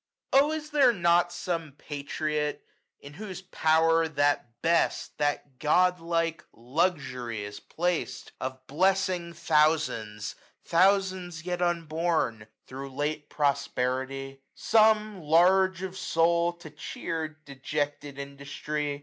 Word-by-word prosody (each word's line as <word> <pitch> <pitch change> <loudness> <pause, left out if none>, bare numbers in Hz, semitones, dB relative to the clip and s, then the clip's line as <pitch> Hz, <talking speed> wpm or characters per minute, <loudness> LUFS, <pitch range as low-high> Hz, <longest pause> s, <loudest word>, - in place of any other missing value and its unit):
Oh 280 +3 +5
is 310 -1 -4
there 280 -4 +5
not 175 -2 +3
some 165 -6 -3
patriot, 150 +1 -3 0.4
in 140 - -11
whose 190 +1 -7
power 165 -1 +3
That 145 -6 0
best, 170 +1 +1
that 145 -2 -1
godlike 165 0 +1
Luxury 125 - -1
is 105 0 -7
placM, 175 0 -2
Of 130 0 -5
blessing 185 +2 +1
thousands, 150 - +1 0.3
thousands 185 -2 +2
yet 180 -1 -2
unborn, 165 -7 0
910 105 - -14 0.2
Thro* 135 +1 -7
late 145 +2 -3
posterity? 135 -1 -1
some, 215 -3 +3
large 185 +4 +4
of 190 0 -5
soul. 170 -1 +2
To 170 -3 -12
cheer 160 +1 -4 0.2
dejected 145 +1 -3
industry 140 +1 -4
160 Hz, 105 wpm, -28 LUFS, 140-175 Hz, 0.4 s, Oh